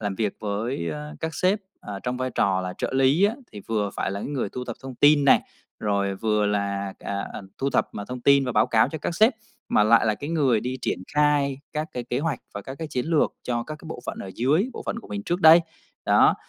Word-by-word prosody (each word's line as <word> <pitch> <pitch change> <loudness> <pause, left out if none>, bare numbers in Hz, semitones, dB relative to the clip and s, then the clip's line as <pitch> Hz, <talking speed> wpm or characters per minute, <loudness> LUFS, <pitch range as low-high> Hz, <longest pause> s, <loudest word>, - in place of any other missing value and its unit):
làm 100 -2 -2
việc 105 -1 -1
với, 105 -4 -2
a, 75 0 -6
các 160 -1 -3
sếp, 190 +3 +2 0.2
à, 100 -1 -6
trong 125 0 -2
vai 130 0 -2
trò 95 -4 +1
là 90 0 -4
trợ - - -2
lý 135 +8 +4
á, 215 +3 +2 0.2
thì 105 - -8
vừa 105 -3 0
phải - - -1
là 100 +1 -4
cái - - -5
người 135 -8 -2
thu 125 +3 -6
thập 120 - -6
thông 135 -1 -7
tin 145 +2 +5
này, - - +6 0.4
rồi 100 -2 0
vừa 105 0 +1
là, 100 -1 -1
à, 100 0 -4
à, - - -7 0.2
thu 135 +1 0
thập - - +1
mọi 100 - -5
thông 125 -1 -5
tin 140 +1 +5
và 125 - -2
báo 105 +1 +4
cáo 110 -1 +3
cho 160 - -5
các 170 - -3
sếp, 220 +7 +5 0.4
mà - - +4
lại 115 +1 +5
là 110 - +2
cái 145 +7 -6
người 135 -9 +2
đi 130 +1 -3
triển - - -1 0.2
khai 145 -2 +2
các 155 +1 -2
cái 125 -1 -4
kế 125 +1 -2
hoạch 150 -4 -1 0.2
và 100 - -5
các 135 - -7
cái 160 - -5
chiến 125 -1 -2
lược 165 -3 +2
cho 120 -1 -1
các 155 - -7
cái 160 - -13
bộ 160 - -6
phận - - -4
ở 95 - -6
dưới, 150 - +2
bộ - - -7
phận - - -2
của - - -12
mình 100 0 -4
trước 175 - -2
đây. 160 +2 +9 0.5
Đó, - - +5
125 Hz, 260 wpm, -25 LUFS, 105-150 Hz, 0.5 s, đây